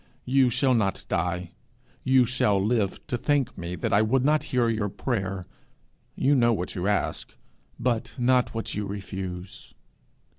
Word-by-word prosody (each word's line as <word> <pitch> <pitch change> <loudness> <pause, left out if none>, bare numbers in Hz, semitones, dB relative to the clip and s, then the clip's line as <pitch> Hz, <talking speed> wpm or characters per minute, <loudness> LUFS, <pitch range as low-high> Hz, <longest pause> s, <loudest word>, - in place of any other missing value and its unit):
You 130 0 +4
shall 130 +2 +2
not 105 -5 0
die; 90 0 -1 0.5
you 130 -1 +5
shall 115 -5 +2
live 105 -1 0
to 120 - -3
thank 145 -2 +1
me 85 +1 -5
that 85 - -2
I 100 - +5
would 125 +4 +2
not 150 +1 +3
hear 125 -2 +2
your 110 -3 0
prayer. 95 -5 -3 0.7
You 140 +2 +2
know 120 -4 +4
what 90 -4 -3
you 90 0 -2
ask, 105 -1 -1 0.4
but 120 -2 -1
not 125 -1 +2
what 115 - -3
you 105 0 -3
refuse.' 95 -2 -7
110 Hz, 155 wpm, -26 LUFS, 95-125 Hz, 0.7 s, you